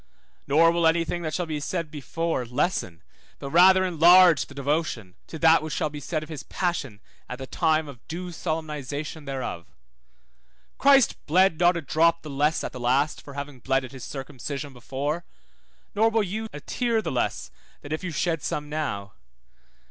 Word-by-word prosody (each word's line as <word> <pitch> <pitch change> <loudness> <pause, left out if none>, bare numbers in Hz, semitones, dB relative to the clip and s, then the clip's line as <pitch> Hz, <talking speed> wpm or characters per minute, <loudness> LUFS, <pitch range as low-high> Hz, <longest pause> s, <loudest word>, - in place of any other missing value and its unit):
Nor 165 +4 +5
will 170 -1 +2
any 165 +1 +2
thing 175 +1 -3
that 160 -2 -3
shall 180 - -1
be 155 -2 -3
said 165 +1 -3
before 165 0 -2
lessen, 120 - -2 0.3
but 140 - -7
rather 185 +3 +6
enlarge 175 -1 +6
the 140 - -14
devotion, 140 - -2
to 160 - -7
that 160 +1 +5
which 155 -1 -4
shall 155 - -1
be 150 - -7
said 155 +2 -3
of - - -10
his 155 -4 -6
passion 150 - -3 0.3
at 125 - -5
the 135 - -6
time 160 +1 +1
of 130 -5 -12
due 175 +2 -5
solemnization 155 -2 -4
thereof. 130 -11 -5 1.1
Christ 275 -3 +4
bled 175 +1 +3
not 175 0 +4
a - - -3
drop 165 +4 +2
the 155 - -7
less 150 +3 +1
at - - -4
the 125 - -8
last 130 +5 +1
for 140 - -12
having 140 -2 -6
bled 135 +2 0
at 125 - -11
his 130 -3 -10
circumcision 140 +1 -6
before, 140 +6 -3 0.7
nor 220 +2 +3
will 225 -1 +1
you 215 +4 -4
a 150 - -8
tear 230 - -1
the - - -3
less 125 - -2 0.3
then 145 - -10
if 155 - -3
you 185 - -3
shed 165 0 -1
some 150 0 -3
now. 115 -11 -3
155 Hz, 185 wpm, -25 LUFS, 140-170 Hz, 1.1 s, rather